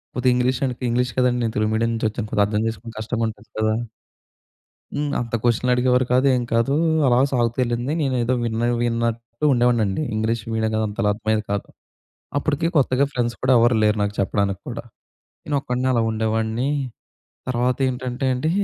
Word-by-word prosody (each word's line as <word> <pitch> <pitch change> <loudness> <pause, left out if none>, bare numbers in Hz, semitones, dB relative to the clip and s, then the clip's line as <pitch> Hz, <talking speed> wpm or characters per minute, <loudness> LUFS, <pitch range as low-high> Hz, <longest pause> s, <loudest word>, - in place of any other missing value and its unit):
కొద్దిగా 125 0 +3
English 125 +2 +1
and 125 - -2
English 125 0 0
కదండీ. 125 -1 +2
నేను 115 - -2
తెలుగు 110 0 +1
మీడియం 115 +1 +1
నుంచొచ్చాను 110 -1 -2
కొద్ది 105 - +3
అర్థం 105 +1 -1
చేసుకుని 115 0 -6
కష్టంగా 115 +1 -1
ఉంటది 110 0 -13
కదా! 110 0 +2 1.2
హ్మ్, 145 0 -1
అంత 120 -1 -5
క్వెషన్‌లు 120 +1 +2
అడిగేవారు 125 0 +2
కాదు 130 +2 +3
ఏం 125 - 0
కాదు. 115 +4 +2 0.3
అలా 120 -1 +4
సాగుతూ 120 -2 0
వెళ్ళింది. 120 +2 -1
నేనేదో 130 -3 +1
విన్న 115 0 -1 0.2
విన్నట్టు 115 +2 -2
ఉండేవాడిని 120 -2 +3
అండి. 100 +9 -2
ఇంగ్లీష్ 110 +1 -1
మీడియం 110 0 0
కదా! 110 - +1
అంత‌లా 105 0 -1
అర్థమయ్యేది 110 0 -1
కాదు. 100 - -2 0.7
అప్పటికి 150 +3 0
కొత్తగా 135 -1 +3
ఫ్రెండ్స్ 120 -1 -1
కూడా, 130 0 +3
ఎవరు 120 0 +4
లేరు 105 0 +3
నాకు 100 0 -1
చెప్పడానికి 100 0 0
కూడా. - - -6 0.6
నేను 145 - -1
ఒక్కడినే 125 -1 -1
అలా 115 -2 +2
ఉండేవాడిని. 110 +3 -1 0.8
తర్వాత 125 0 +1
ఏంటంటే 125 0 -4
అండి, 140 +6 -1
120 Hz, 165 wpm, -22 LUFS, 110-125 Hz, 1.2 s, అలా